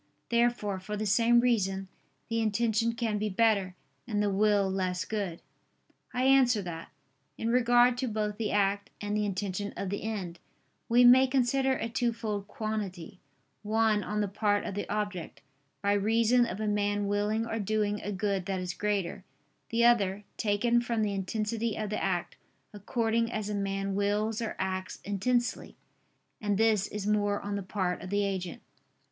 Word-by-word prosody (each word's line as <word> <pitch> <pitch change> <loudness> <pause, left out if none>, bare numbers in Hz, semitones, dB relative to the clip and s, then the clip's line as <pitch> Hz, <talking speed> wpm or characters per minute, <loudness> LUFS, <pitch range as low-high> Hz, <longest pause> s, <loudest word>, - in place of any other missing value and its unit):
Therefore, 235 -4 +1
for 210 +3 -5
the 215 - -2
same 230 +3 +4
reason, 195 -6 +1 0.4
the 230 0 -1
intention 225 +1 +1
can 230 -3 -1
be 210 0 -1
better, 200 -3 +2 0.3
and 210 - -1
the 205 -1 +1
will 205 0 +3
less 185 -1 -1
good. 195 -6 -4 0.7
I 250 0 -1
answer 260 -4 +5
that, 165 -2 -7 0.5
In 230 - -1
regard 245 0 +4
to 260 - -1
both 210 -2 -2
the 220 - -1
act, 200 0 +1
and 205 0 -2
the 210 0 +1
intention 200 +1 -3
of 195 - -3
the 200 - -3
end, 195 -6 -4 0.5
we 245 +1 +6
may 260 +2 +8
consider 265 +1 +2
a 235 - -2
twofold 225 -4 -2
quantity: 205 -4 -5 0.4
one, 215 -1 +2
on 210 0 -2
the 205 - 0
part 205 +1 0
of - - -4
the 205 - -4
object, 205 -4 -3 0.4
by 200 0 +3
reason 225 +4 +3
of 195 - -5
a 215 - -1
man 205 0 0
willing 210 +2 0
or 225 -1 -3
doing 210 0 0
a 205 - -4
good 195 -2 -1
that 190 -1 -1
is 180 -1 -3
greater; 200 -3 -2 0.5
the 235 +1 +2
other, 205 -4 +3
taken 225 +3 +2
from 235 -2 -1
the 205 -1 0
intensity 215 +3 -2
of 215 -1 -3
the 215 - -2
act, - - -2 0.4
according 230 +2 0
as 215 -2 -3
a - - -2
man 195 -1 -2
wills 210 +3 0
or 225 - -3
acts 185 0 -3
intensely; 240 +5 -1 0.6
and 205 -2 0
this 220 -2 +3
is 205 -1 -5
more 205 -1 +1
on 205 0 -3
the 200 - -2
part 185 -2 -2
of 185 - -7
the 205 +1 +1
agent. 185 -3 -4
210 Hz, 170 wpm, -29 LUFS, 200-230 Hz, 0.7 s, may